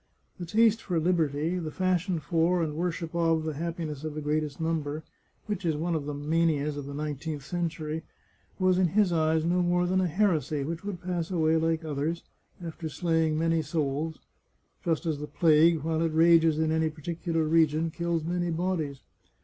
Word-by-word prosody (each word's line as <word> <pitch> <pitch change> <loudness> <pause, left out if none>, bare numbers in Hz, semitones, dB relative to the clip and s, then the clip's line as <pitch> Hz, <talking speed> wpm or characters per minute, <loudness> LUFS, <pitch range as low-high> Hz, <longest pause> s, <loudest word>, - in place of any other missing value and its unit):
The 175 - -5
taste 225 +3 +3
for 175 -4 -1
liberty, 160 0 +1
the 160 -3 -4
fashion 185 +1 0
for 165 +3 +1
and 155 -2 -2
worship 170 0 -3
of 165 -2 +2
the 155 0 -2
happiness 160 -2 -4
of 155 -1 -4
the 155 - -3
greatest 150 -1 -1
number, 160 -2 -2 0.4
which 205 -2 -3
is 165 -3 +1
one 170 +3 -1
of 150 -3 -2
the 150 - -3
manias 150 0 +1
of 145 -1 -6
the 140 - -6
nineteenth 150 0 -4
century, 160 -2 -3 0.6
was 185 -1 +3
in 185 - +4
his 200 -5 +4
eyes 160 0 +2
no 180 +2 +2
more 175 0 +2
than 185 +1 +2
a 185 - +1
heresy, 165 -5 +1
which 165 +4 -4
would 200 -4 -5
pass 175 -2 -2
away 160 -3 +2
like 160 0 0
others, 155 +3 -2 0.4
after 160 -1 -5
slay 165 +2 +1
ing 155 -1 0
many 165 0 +2
souls, 155 0 -2 0.7
just 165 0 0
as 155 -3 -1
the 150 - -5
plague, 155 +1 +4
while 160 0 0
it 165 -1 +1
rages 165 -1 +5
in 160 0 +1
any 160 0 +2
particular 165 +1 -2
region, 160 0 +2
kills 170 -1 -1
many 175 +1 -1
bodies. 165 -5 -2
160 Hz, 185 wpm, -28 LUFS, 155-170 Hz, 0.7 s, rages